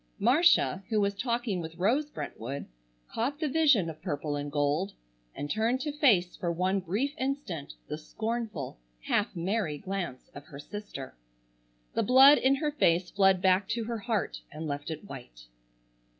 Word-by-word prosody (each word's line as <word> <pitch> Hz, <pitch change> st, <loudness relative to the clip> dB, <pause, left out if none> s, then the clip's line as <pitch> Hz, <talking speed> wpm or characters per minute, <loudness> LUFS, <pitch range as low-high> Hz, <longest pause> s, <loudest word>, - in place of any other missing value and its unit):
Marcia, 250 Hz, -, +4 dB
who 220 Hz, -2 st, +2 dB
was 200 Hz, -1 st, +1 dB
talking 235 Hz, -3 st, -1 dB
with 160 Hz, 0 st, -7 dB
Rose 250 Hz, +11 st, +1 dB
Brentwood, 135 Hz, -, -6 dB, 0.4 s
caught 275 Hz, +6 st, -2 dB
the 310 Hz, -, 0 dB
vision 285 Hz, -, +4 dB
of 160 Hz, -2 st, -7 dB
purple 150 Hz, -4 st, -3 dB
and 145 Hz, 0 st, -4 dB
gold 150 Hz, +7 st, 0 dB, 0.4 s
and 145 Hz, -, -4 dB
turned 225 Hz, -, +1 dB
to 295 Hz, -, -2 dB
face 225 Hz, -, +3 dB
for 175 Hz, -, -2 dB
one 185 Hz, +3 st, +1 dB
brief 205 Hz, +11 st, -1 dB
instant 260 Hz, -, -3 dB
the 150 Hz, -, -5 dB
scornful, 220 Hz, -, -4 dB, 0.2 s
half 205 Hz, -, 0 dB
merry 175 Hz, -2 st, -1 dB
glance 185 Hz, -7 st, -5 dB
of 140 Hz, -, -10 dB
her 140 Hz, -, -10 dB
sister. 145 Hz, -4 st, -8 dB, 0.8 s
The -, -, +1 dB
blood 265 Hz, +5 st, +8 dB
in 265 Hz, +2 st, +4 dB
her 295 Hz, +2 st, -1 dB
face 175 Hz, -, +2 dB
fled 195 Hz, -2 st, +3 dB
back 190 Hz, +1 st, +3 dB
to 230 Hz, 0 st, -1 dB
her 230 Hz, 0 st, -3 dB
heart 220 Hz, -2 st, -2 dB
and 155 Hz, +2 st, -6 dB
left 145 Hz, 0 st, -4 dB
it 160 Hz, +2 st, -5 dB
white. -, -, -10 dB
195 Hz, 165 wpm, -29 LUFS, 160-240 Hz, 0.8 s, blood